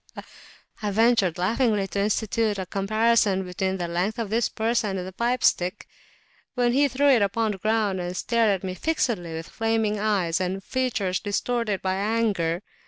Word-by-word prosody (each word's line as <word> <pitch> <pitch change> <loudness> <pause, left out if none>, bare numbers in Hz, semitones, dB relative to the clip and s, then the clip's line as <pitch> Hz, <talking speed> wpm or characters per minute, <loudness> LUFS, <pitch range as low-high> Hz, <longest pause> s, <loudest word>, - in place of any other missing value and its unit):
I 210 - -1
ventured 220 -4 +3
laughingly 210 +2 +1
to 200 - -3
institute 215 +1 0
a 190 - -3
comparison 205 0 +2
between 190 +1 -2
the 175 -2 -3
length 180 +7 -1
of 225 -3 -3
his 230 +1 +1
person 220 -3 -1
and 180 - -4
the 190 - -9
pipe 240 +5 -1
stick, 180 +1 +1 0.7
when 245 -1 +2
he 285 +2 +4
threw 280 +2 +2
it 250 -5 +5
upon 215 +2 +1
the 195 - -7
ground, 215 -3 0
and 180 +1 -4
stared 230 +1 +2
at 195 -2 0
me 185 -1 -3
fixedly 210 - -1
with 160 0 -6
flaming 225 -2 0
eyes 190 -5 0
and 190 +1 -2
features 220 -8 -1
distorted 215 0 -2
by 185 0 0
anger. 200 -5 0
210 Hz, 170 wpm, -25 LUFS, 190-230 Hz, 0.7 s, it